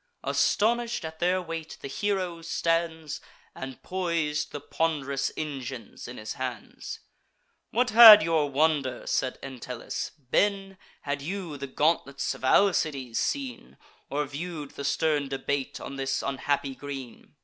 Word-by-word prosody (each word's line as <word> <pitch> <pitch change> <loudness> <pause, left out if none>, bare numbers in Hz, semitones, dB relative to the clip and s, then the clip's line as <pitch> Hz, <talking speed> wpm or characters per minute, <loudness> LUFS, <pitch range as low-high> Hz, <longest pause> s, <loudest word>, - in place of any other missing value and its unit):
Astonish'd 235 -2 +1
at 160 0 -7
their 180 +2 +2
weight, 165 -1 -6
the - - -5
hero 185 +1 -2
stands, 165 -2 -1 0.3
And 130 -1 -7
pois'd 170 -5 -1
the 145 - -5
pond'rous 140 -4 -1
engines 135 -5 -6
in 120 - -8
his 110 0 -5
hands. 125 -5 -6 0.7
"What 245 +2 +1
had 220 -2 +12
your 160 -3 +2
wonder," 140 -3 +1
said 130 -1 0
Entellus, 125 -2 -5 0.2
"been, 195 -1 +1 0.2
Had 145 0 -3
you 175 0 -4
the 140 0 -5
gauntlets 140 -1 0
of 135 - -13
Alcides 140 - +2
seen, 260 -5 -3 0.3
Or 145 +1 0
view'd 150 0 -6
the 140 - -7
stern 150 0 +1
debate 135 0 -2
on 140 - -7
this 135 0 -1
unhappy 140 0 -1
green! 135 -2 -8
150 Hz, 130 wpm, -27 LUFS, 135-175 Hz, 0.7 s, had